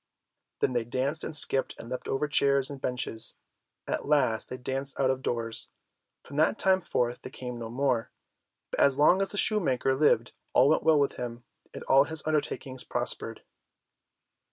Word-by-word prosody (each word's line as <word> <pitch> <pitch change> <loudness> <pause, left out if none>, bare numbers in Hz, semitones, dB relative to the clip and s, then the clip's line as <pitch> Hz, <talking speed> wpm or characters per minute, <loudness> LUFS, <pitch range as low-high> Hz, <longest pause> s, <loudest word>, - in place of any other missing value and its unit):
Then 130 - +2
they 120 -1 +1
danced 130 +6 -2
and 160 - -4
skipped 135 -2 +1
and - - -8
leapt 125 +1 -5
over 140 +3 0
chairs 140 -2 +2
and 140 -2 -8
benches. 115 -3 -2 0.5
At - - -2
last 130 -7 +2
they 125 - -5
danced 135 +2 -4
out 130 -1 +3
of 130 0 -3
doors. 115 -3 -1 0.5
From 140 - -9
that 155 +7 +3
time 190 -1 +3
forth 125 -6 -1
they - - -8
came 125 -2 -7
no 115 -1 -6
more, 125 -1 0 0.6
but - - -3
as 140 -1 +4
long 175 +6 +5
as 195 - 0
the 205 - -6
shoemaker 155 - +2
lived 130 -4 +3 0.2
all 130 +3 +6
went 155 - +3
well 160 -2 +4
with 140 - 0
him, 120 -1 -5 0.3
and - - -8
all 135 +1 +5
his 160 +1 -3
undertakings 145 -4 -2
prospered. - - -4
135 Hz, 180 wpm, -28 LUFS, 125-150 Hz, 0.6 s, all